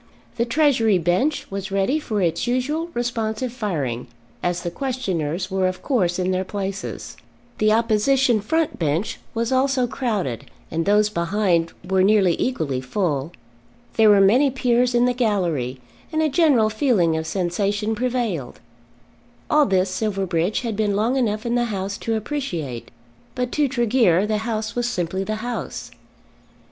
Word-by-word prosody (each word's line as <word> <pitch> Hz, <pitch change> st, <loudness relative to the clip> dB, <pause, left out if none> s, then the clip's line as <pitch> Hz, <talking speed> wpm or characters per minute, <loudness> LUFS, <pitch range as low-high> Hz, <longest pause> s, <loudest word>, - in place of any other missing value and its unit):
The 235 Hz, -, +1 dB
Treasury 235 Hz, -6 st, +3 dB
bench 180 Hz, -, +1 dB
was 195 Hz, 0 st, -4 dB
ready 195 Hz, +10 st, +1 dB
for 215 Hz, -9 st, -2 dB
its 170 Hz, +5 st, 0 dB
usual 290 Hz, +7 st, -1 dB
responsive 235 Hz, 0 st, -2 dB
firing, 145 Hz, -, -3 dB, 0.3 s
as 175 Hz, -1 st, -1 dB
the 175 Hz, -, -3 dB
questioners 185 Hz, -, -2 dB
were 190 Hz, -1 st, +1 dB
of 185 Hz, 0 st, -4 dB
course 185 Hz, -11 st, +1 dB
in 185 Hz, 0 st, 0 dB
their 185 Hz, 0 st, 0 dB
places. 195 Hz, 0 st, -5 dB, 0.4 s
The 215 Hz, 0 st, +3 dB
opposition 230 Hz, +2 st, +3 dB
front 320 Hz, +8 st, -1 dB
bench 160 Hz, +5 st, -1 dB, 0.2 s
was 230 Hz, +1 st, -1 dB
also 260 Hz, -1 st, +2 dB
crowded, 210 Hz, -, -2 dB, 0.3 s
and 165 Hz, +2 st, -1 dB
those 210 Hz, +1 st, +4 dB
behind 170 Hz, -2 st, +1 dB
were 190 Hz, 0 st, +2 dB
nearly 195 Hz, -3 st, +4 dB
equally 155 Hz, -, -1 dB
full. 145 Hz, 0 st, -1 dB, 0.6 s
There 220 Hz, -1 st, +5 dB
were 205 Hz, -1 st, +6 dB
many 240 Hz, +9 st, +5 dB
Peers 250 Hz, -1 st, +1 dB
in 240 Hz, 0 st, +4 dB
the 250 Hz, -, +2 dB
gallery, 175 Hz, -, 0 dB, 0.3 s
and 315 Hz, 0 st, +1 dB
a 310 Hz, -, +2 dB
general 270 Hz, -8 st, +3 dB
feeling 215 Hz, -, +2 dB
of 160 Hz, 0 st, -3 dB
sensation 200 Hz, +4 st, -1 dB
prevailed. 230 Hz, -, -2 dB, 0.9 s
All 300 Hz, -1 st, +5 dB
this 190 Hz, -1 st, +1 dB
Silverbridge 190 Hz, -3 st, -1 dB
had 230 Hz, -4 st, -3 dB
been 205 Hz, -1 st, 0 dB
long 225 Hz, +5 st, +1 dB
enough 215 Hz, -4 st, 0 dB
in 235 Hz, -, 0 dB
the 240 Hz, 0 st, +2 dB
House 200 Hz, -3 st, -3 dB
to 225 Hz, -, -1 dB
appreciate; 180 Hz, -, -4 dB, 0.5 s
but 250 Hz, -1 st, -2 dB
to 295 Hz, -2 st, +2 dB
Tregear 235 Hz, -7 st, +2 dB
the 215 Hz, 0 st, 0 dB
House 220 Hz, -1 st, -3 dB
was 240 Hz, 0 st, -1 dB
simply 185 Hz, -3 st, -2 dB
the 215 Hz, +2 st, -2 dB
House. 245 Hz, -1 st, -5 dB
210 Hz, 155 wpm, -22 LUFS, 185-245 Hz, 0.9 s, were